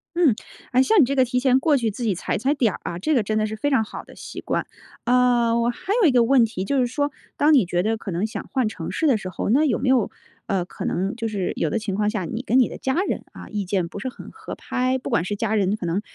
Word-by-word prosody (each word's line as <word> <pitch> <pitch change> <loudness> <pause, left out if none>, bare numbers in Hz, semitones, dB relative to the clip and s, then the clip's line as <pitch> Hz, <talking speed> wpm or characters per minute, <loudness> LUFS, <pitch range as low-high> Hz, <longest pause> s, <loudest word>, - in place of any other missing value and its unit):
嗯， 325 -10 +4 0.4
哎， 255 +1 +5
像 430 +7 +4
你 285 - +7
这 275 +3 -2
个 260 - +5
提 250 0 0
前 255 0 +4
过 295 +1 +3
去 235 -3 0
自 220 +4 -6
己 220 -4 +1
踩 180 - -2
踩 265 +7 +1
点 240 -9 +1
儿 - - -8
啊， 170 - -4
这 310 +10 +1
个 235 - +3
真 215 +1 -1
的 215 - +1
是 215 - -5
非 250 +7 -1
常 265 -6 +3
好 - - -8
的 - - -15
习 - - -8
惯。 - - -2 0.4
呃， 245 -2 +3
我 235 0 +2
还 355 +11 -3
有 375 - +6
一 - - +4
个 245 -2 +4
问 255 0 +5
题， 215 -4 -2
就 275 +6 +1
是 250 - +3
说 285 +3 -1 0.3
当 300 +2 +4
你 255 -9 +5
觉 175 0 0
得 220 +4 0
可 220 -3 -6
能 180 +5 -1
想 220 - -6
换 260 -4 +1
城 185 -6 -5
市 320 - 0
的 270 - +4
时 190 -3 -6
候， 185 - -3
那 275 +7 +4
有 280 -6 +1
没 260 - -2
有， 255 -4 +3 0.4
呃， 190 -3 0
可 - - -8
能 190 +3 -1
就 230 -1 -3
是 200 -4 -2
有 165 - 0
的 225 - -1
情 210 -3 -3
况 210 +1 +1
下， 210 -4 -2
你 225 +8 -4
跟 255 0 +2
你 250 - +4
的 - - -8
家 265 - -1
人， - - -2
啊， - - -11
意 210 -2 -3
见 185 -2 -1
不 200 - -8
是 260 - -3
很 - - -11
合 440 0 -9
拍？ 255 +1 -1
不 260 - -6
管 165 - +2
是 205 +3 -3
家 220 0 0
人 200 0 +1
可 190 - -5
能 175 +4 0
230 Hz, 325 characters per minute, -23 LUFS, 205-260 Hz, 0.4 s, 你